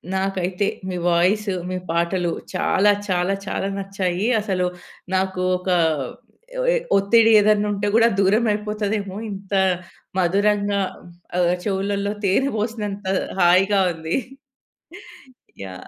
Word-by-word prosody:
నాకైతే 190 0 -1 0.2
మీ 180 - -3
వాయిసు, 190 +3 +2 0.2
మీ 185 - -2
పాటలు 170 +1 0 0.2
చాలా 205 +2 +3 0.2
చాలా 180 +1 +1
చాలా 195 - -2
నచ్చాయి. 195 0 -2
అసలు 185 -3 -1 0.5
నాకు 190 -1 -1 0.2
ఒక 180 +1 -6 1.0
ఏ - - +3 0.2
ఒత్తిడి 225 +3 +4
ఏదైనా 210 0 +3
ఉంటే 205 +1 -2
కూడా 230 0 +6
దూరం 210 +4 +3
అయిపోతదేమో 210 -1 -2
ఇంత 195 0 -8 0.6
మధురంగా 200 +2 +2 0.6
ఆహ్, 175 0 +3
చెవులలో 200 0 -1
తేనె 200 +9 +2
పోసినంత 210 -2 -3 0.3
హాయిగా 190 +3 +4
ఉంది. 160 0 -3 1.5
యాహ్! 95 -1 -9
195 Hz, 105 wpm, -22 LUFS, 185-205 Hz, 1.5 s, కూడా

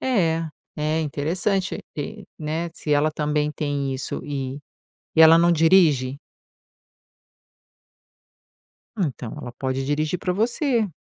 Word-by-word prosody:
É, 165 -10 +1 0.3
é 155 +1 0
interessante, 175 +6 -1 0.2
é, 205 +8 -5
né, 160 +2 -2
se 150 - -2
ela 150 +2 +3
também 150 0 0
tem 145 -2 -2
isso 130 - -4
e 135 -1 -4 0.6
e 160 - +6
ela 160 +1 +9
não 170 +1 +4
dirige? 160 -6 +4 2.8
Ah, 200 - 0
então 125 -5 -5
ela 120 - -7
pode 130 +1 -3
dirigir 155 +4 0
pra 180 0 -1
você. 235 - +1
155 Hz, 120 wpm, -23 LUFS, 145-175 Hz, 2.8 s, ela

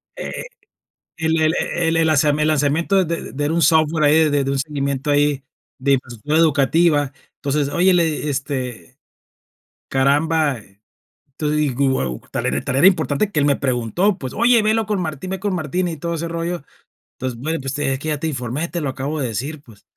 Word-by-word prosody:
Eh, - - -5 0.7
el 160 0 +1
el 155 0 +3
e - - 0 0.3
el 165 - +1
el - - +2
el 165 0 +3
lazami 150 -1 +3
el 150 - +2
lazamiento 155 +6 +2
de 170 +1 -3
de - - -9
de 145 +2 -2
era 150 - 0
un 170 - +1
software 160 -1 +3
ahí 155 +1 +5
de 145 -1 +1
de 135 - -1
un 140 - -1
seguimiento 140 -1 -2
ahí 145 -1 +2 0.3
de 140 +1 +2
infraestructura 130 +4 -1
educativa. 150 -1 +3 0.2
Entonces, 140 0 -1
oye, 180 +5 +3
le 175 - +4
eh, 150 -1 -2
este, 130 - -4 0.9
caramba, 145 +2 +2 0.6
entonces 150 +2 -3
digo: 140 -2 +1
"Guau, 65 - -1
tal - - -2
era 70 +2 0
tal - - -2
era 150 +7 +6
importante 180 +1 +2
que 155 - 0
él 145 - +2
me 140 -2 +3
preguntó", 140 - 0
pues, 130 -5 -6
oye 235 0 +4
velo 220 +1 +1
con 205 -2 -1
Martín, 160 +1 -4
ve 190 -1 -4
con 200 -1 -1
Martín 175 +2 -1
y 165 - -4
todo 170 +3 -3
ese 165 +1 -3
rollo. 170 -1 -3 0.5
Entonces: 130 -3 -5
"Bueno, 160 +5 -2
pues, 135 +1 -4
es 135 -2 0
que 155 - -4
ya 150 -2 -1
te 160 - -2
informé, 135 +2 -3
te 170 -1 -4
lo 145 - -1
acabo 140 +4 -3
de 130 - -1
decir, 140 +7 -4
pues". 115 -7 -19
150 Hz, 205 wpm, -20 LUFS, 135-165 Hz, 0.9 s, era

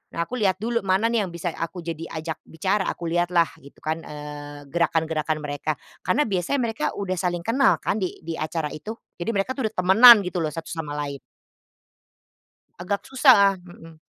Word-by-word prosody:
Nah, 170 - 0
aku 250 +4 -5
lihat 190 -3 +2
dulu 235 +3 -1
mana 195 +2 +1
nih 230 -2 +1
yang - - -7
bisa 170 0 -3
aku 170 +2 -5
jadi 165 0 -5
ajak 160 0 -5
bicara, 190 +5 0
aku 170 - -5
lihatlah 175 0 +2 0.2
gitu 140 - -16
kan 160 +1 -2
eee, 145 -1 -8
gerakan-gerakan 160 -1 0
mereka. 145 +1 -2 0.3
Karena 270 +11 +2
biasanya 190 +7 0
mereka 225 -1 -2
udah 195 -2 -2
saling 175 -1 -1
kenal 265 +4 +3
kan - - -1
di 185 - -3
di 165 - -3
acara 155 -1 -2
itu, 155 +9 -6 0.3
jadi 175 - -2
mereka 200 +6 0
tuh 260 - -1
udah - - -26
temenan 210 +5 +9
gitu 180 -1 -2
loh, - - -1
satu 165 -1 -7
sama 155 -3 -5
lain. 140 -1 -4 1.6
Agak 190 +3 -2
susah 235 -8 +5
mhm. 165 -3 -15
175 Hz, 185 wpm, -24 LUFS, 160-200 Hz, 1.6 s, temenan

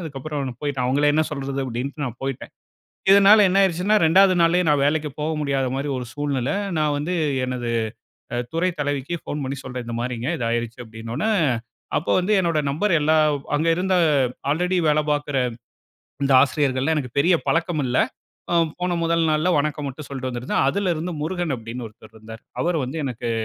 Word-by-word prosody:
அதுக்கப்பறம் 145 -2 -5
நான் 120 -1 -9
போயிட்டு, 140 -3 -1
அவங்கள 140 +4 +2
என்ன 155 +1 +3
சொல்றது? 140 -1 -4
அப்படீன்டு 130 +4 -4
நான் 125 -2 -6
போயிட்டேன். 135 -2 -5 0.6
இதனால 200 +1 +7
என்ன 195 +2 +3
ஆகிருச்சுன்னா, 190 +3 +2
2ஆவது 185 +3 +5
நாளே 170 +2 +4
நான் 145 -2 +3
வேலைக்கு 150 0 0
போக 155 +2 -1
முடியாத 135 -2 0
மாரி 140 +2 -2
ஒரு 125 - -4
சூழ்நிலை, 145 -1 -1 0.2
நான் 150 -1 +1
வந்து 165 +5 -2 0.3
எனது 125 -2 -3 0.8
துறைத் 170 +1 0
தலைவிக்கு 145 +2 -2
போன் 145 -1 -3
பண்ணி 135 +1 -3
சொல்றேன், 125 -1 -6
இந்த 115 - -4
மாரிங்க. 120 +2 -3
இது 120 - -2
ஆகிருச்சு. 115 +1 -3
அப்பிடீன்னவொனே 115 - -4 0.7
அப்போ 155 - -1
வந்து 185 +3 0
என்னுடைய 165 -4 +1
நம்பர் 170 +8 0
எல்லா 155 +1 +2 0.4
அங்க 155 +3 +1
இருந்த 185 +2 0 0.6
ஆல்ரெடி 180 +5 +1
வேலை 150 0 +4
பார்க்கிற 145 -1 -1 0.9
இந்த 140 - +2
ஆசிரியர்கள்லாம் 140 +1 +1
எனக்கு 130 -3 -4
பெரிய 170 +5 +4
பழக்கம் 170 -2 0
இல்லை. 125 +1 +2 0.5
அ - - +2 0.3
போன 180 -1 0
முதல் 165 0 +2
நாள்ல 155 +4 +2
வணக்கம் 150 0 -1
மட்டும் 140 +2 -8
சொல்லிட்டு 130 -2 -4
வந்திருந்தேன். 125 +2 -1
அதிலிருந்து 175 0 -1
முருகன் 175 -2 -2
அப்படின்னு 115 +1 -7
ஒருத்தர் 110 +1 -18
இருந்தாரு. 110 +1 -11 0.2
அவரு 175 -1 +1
வந்து 135 +6 -5
எனக்கு 120 -3 -3
145 Hz, 170 wpm, -22 LUFS, 130-165 Hz, 0.9 s, இதனால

